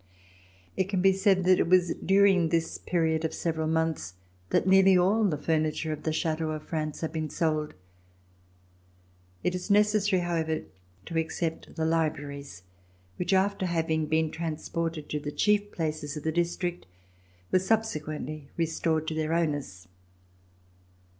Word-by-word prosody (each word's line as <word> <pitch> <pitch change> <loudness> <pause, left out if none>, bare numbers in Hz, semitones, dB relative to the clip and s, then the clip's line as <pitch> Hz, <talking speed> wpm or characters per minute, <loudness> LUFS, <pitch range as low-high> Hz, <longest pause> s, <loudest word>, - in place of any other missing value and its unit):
It 190 - +1
can 190 0 -1
be 195 0 +6
said 190 -1 +3
that 185 0 +4
it - - +2
was 180 -2 +4
during 195 -3 +3
this 165 0 -1
period 160 -2 0
of 160 - -2
several 160 -2 -1
months 160 - -1 0.3
that - - +2
nearly 190 0 +6
all 195 +5 +3
the 165 -7 +1
furniture 155 0 0
of 150 - -7
the 160 - -1
chateaux 160 0 -1
of 155 -1 -4
France 155 -2 -4
had 160 -1 -3
been 155 -1 -2
sold. 155 -1 -1 1.7
It 180 - +1
is 180 +3 -5
necessary, 205 -2 +3
however, 160 -2 -1 0.4
to 165 - -4
except 160 0 -3
the 160 -1 -1
libraries 145 - -2 0.5
which, 180 +2 -2
after 195 0 +2
having 160 -2 0
been 160 0 +1
transported 165 -1 -3
to 150 - -2
the 145 0 -5
chief 205 +4 +1
places 155 -2 -3
of 150 - -7
the 160 - 0
district, 175 - -2 0.6
were 185 - +5
subsequently 155 -8 -2
restored 160 -1 0
to - - -3
their 155 0 -1
owners. 145 - -2
165 Hz, 145 wpm, -28 LUFS, 155-185 Hz, 1.7 s, be